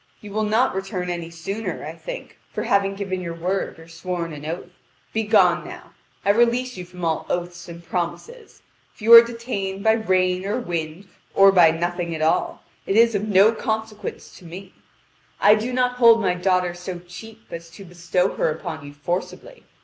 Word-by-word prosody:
You 210 - -11
will 215 +1 -1
not 225 +5 +2
return 190 -2 -3
any 170 -1 -5
sooner. 195 +6 -5
I - - -6
think, - - -9
for - - -3
having 195 0 +1
given 190 -2 -4
your 170 -2 -5
word 180 +3 -2
or 165 0 -14
sworn 170 0 -5
an 150 0 -8
oath. 175 +2 -6 0.4
Begone 220 0 +3
now. - - -11 0.3
I 200 - +5
release 240 +3 +1
you 180 - -7
from 180 -1 -7
all 160 -1 -1
oaths 175 0 -4
and 170 0 -10
promises. 315 - -5 0.3
If - - -15
you 230 +2 +6
are 230 - +13
detained 230 -5 -5
by 220 - +5
rain 185 -4 +1
or 200 +4 -1
wind, 170 -2 -5 0.3
or 195 0 +7
by 175 -4 +6
nothing 170 +1 -2
at 155 - -5
all, 160 - 0 0.2
it 195 - 0
is 230 0 +5
of 205 +1 -1
no 200 +1 +5
consequence 220 -1 -5
to - - -18
me. 185 +3 -10 0.7
I 205 - +6
do 220 +4 -1
not 250 0 0
hold 230 -2 +7
my 190 -4 +1
daughter 180 -1 +1
so 180 +1 -7
cheap 225 +5 -12
as 170 0 -8
to 180 +4 -12
bestow 175 +1 -1
her - - +1
upon 155 0 -5
you 145 0 -10
forcibly. 180 - -5
190 Hz, 190 wpm, -22 LUFS, 175-220 Hz, 0.7 s, are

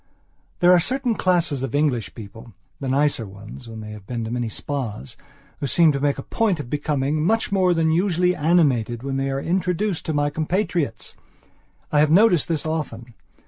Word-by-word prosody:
There 175 0 +6
are 180 - +7
certain 250 +6 -1
classes 175 -9 +1
of 135 +1 -3
English 140 -7 0
peoplethe 110 +1 -11 0.3
nicer 135 -3 0
ones 100 +5 -11
when 110 -1 -8
they 105 0 -8
have 105 -2 -11
been 120 -2 -3
to 110 - -5
many 120 -1 -2
spas, 115 - -5 0.4
who 140 - -2
seem 165 +3 +4
to 140 - -2
make 145 0 +1
a 135 - -6
point 210 -7 0
of 130 -5 -7
becoming 150 0 0
much 225 +6 +1
more 185 -3 +3
than 160 -1 +2
usually 180 +1 +2
animated 135 -8 +2
when 135 0 -2
they 135 0 -1
are 135 0 -1
introduced 180 +3 -1
to 160 - 0
my 145 0 +1
compatriots. 160 - -2 0.8
I 150 - +3
have 150 0 +4
noticed 180 -1 +4
this 160 -3 -2
often. 125 -7 -4
145 Hz, 185 wpm, -22 LUFS, 125-175 Hz, 0.8 s, are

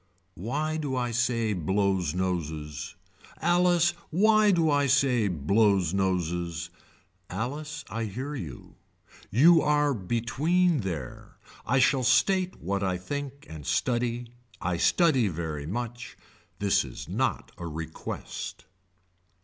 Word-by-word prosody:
Why 145 - -2
do 145 -4 -2
I 120 -1 -1
say 115 -2 +1
blows 95 -2 0
noses. 80 -4 -3 0.4
Alice 175 0 +3 0.2
why 215 +4 +4
do 165 -5 +3
I 145 -1 +3
say 130 -5 +3
blows 95 +2 +2
noses. 85 -3 -1 0.6
Alice 145 - -4
I 115 0 -3
hear 130 +8 -5
you. 80 - -8 0.5
You 160 - +6
are 150 -1 +2
between 135 - +1
there. 85 - -6 0.3
I 125 +4 +2
shall 135 0 +4
state 180 +9 +2
what 100 +3 -2
I 95 -2 0
think 140 +8 -6
and 80 -2 -9
study. 120 - -1 0.3
I 90 -1 -1
study 135 - +3
very 80 -4 -4
much. 120 +5 -5 0.4
This 100 -1 +2
is - - -8
not - - -1
a 85 - -5
request. 80 0 -6
115 Hz, 115 wpm, -27 LUFS, 90-145 Hz, 0.6 s, You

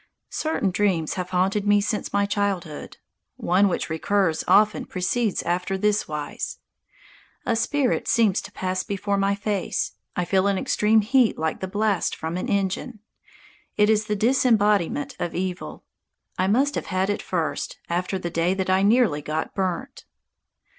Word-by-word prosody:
Certain 310 -11 -1
dreams 180 -5 +1
have 180 -1 -4
haunted 195 +3 +1
me 205 0 +5
since 210 +1 -2
my 200 0 +2
childhood. 200 -6 -3 0.4
One 185 +4 +3
which 170 -4 -1
recurs 165 +1 0
often 205 +3 +4
proceeds 200 +4 -1
after 180 +2 -1
this 210 +2 +1
wise: 150 -1 -5 0.9
A 235 - +1
spirit 260 +3 0
seems 220 -5 +3
to - - -11
pass 185 0 -2
before 200 +1 -2
my 195 0 +1
face. 205 -1 -2 0.2
I 180 - 0
feel 190 +2 +2
an 200 -1 +1
extreme 215 +3 +3
heat 240 +2 +3
like 160 0 -2
the 190 - -3
blast 205 0 0
from 160 +1 -4
an 185 - -3
engine. 200 +4 -2 0.8
It 210 +1 +5
is 215 0 +2
the 220 +5 +1
embodiment 225 - +2
of 175 - -3
evil. 185 0 -4 0.5
I 185 - 0
must 270 +8 +2
have - - -4
had 190 +1 0
it 205 - -3
first 165 -4 -3
after 180 +3 -1
the 175 -2 -5
day 170 +3 +1
that 190 -1 -1
I 190 +1 +3
nearly 205 -7 +3
got 155 +2 -3
burnt. 195 +8 -3
195 Hz, 160 wpm, -24 LUFS, 180-210 Hz, 0.9 s, me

